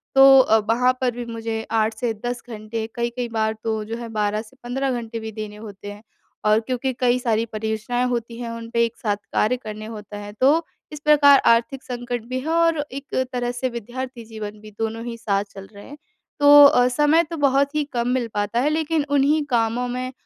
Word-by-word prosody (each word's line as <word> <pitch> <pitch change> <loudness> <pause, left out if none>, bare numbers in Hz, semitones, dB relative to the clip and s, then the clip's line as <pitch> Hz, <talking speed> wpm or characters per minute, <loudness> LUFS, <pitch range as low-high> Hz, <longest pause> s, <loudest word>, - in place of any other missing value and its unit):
तो 270 - +7 0.2
अ, 220 -4 +5
वहाँ 250 +2 +4
पर 250 -1 +2
भी 240 0 -6
मुझे 225 -1 -4
8 220 0 +1
से 240 -3 -1
10 245 0 -3
घंटे 220 0 -5
कई-कई 240 +1 -2
बार 220 -1 0
तो 220 -1 -1
जो 225 - -5
है 235 0 -6
12 210 -1 -1
से 230 +4 -17
15 265 +2 -2
घंटे 230 0 -6
भी 220 0 -6
देने 210 -1 -7
होते 205 -1 -9
हैं। 205 +1 -12 0.4
और 215 +1 +4
क्योंकि 255 +3 -2
कई 250 -1 +3
सारी 230 -2 0
परियोजनाएँ 220 +3 -2
होती 235 -1 -3
हैं 235 -1 -5
उन 230 0 -7
पे 235 0 +2
एक 230 - -7
साथ 210 -3 -1 0.2
कार्य 240 +4 +2
करने 215 -3 -8
होते 210 -2 -9
है। 205 0 -8
तो 310 +5 +4 0.3
इस 300 - -7
प्रकार 290 -2 +6
आर्थिक 235 +4 +2
संकट 245 -1 -4
भी 255 +2 -3
है 295 +5 -5
और 330 0 +3
एक 275 +1 -7 0.2
तरह 245 -1 -1
से 245 +1 -2
विद्यार्थी 240 +1 -7
जीवन 215 -1 -8
भी 215 - -12
दोनों 225 +1 -3
ही 235 - -5
साथ 200 -3 0
चल 195 0 -10
रहे 205 - -12
हैं। 290 - -11 0.4
तो 290 0 +9
अ, 250 -3 +5
समय 295 +6 +3
तो 330 - -5
बहुत 280 +1 +2
ही 300 - +2
कम 235 0 0
मिल 250 -1 0
पाता 205 +3 -1
है 290 - +2
लेकिन 315 -1 0
उन्ही 285 +2 +3
कामों 235 +1 +1
में 255 +1 -4
235 Hz, 215 wpm, -22 LUFS, 220-260 Hz, 0.4 s, तो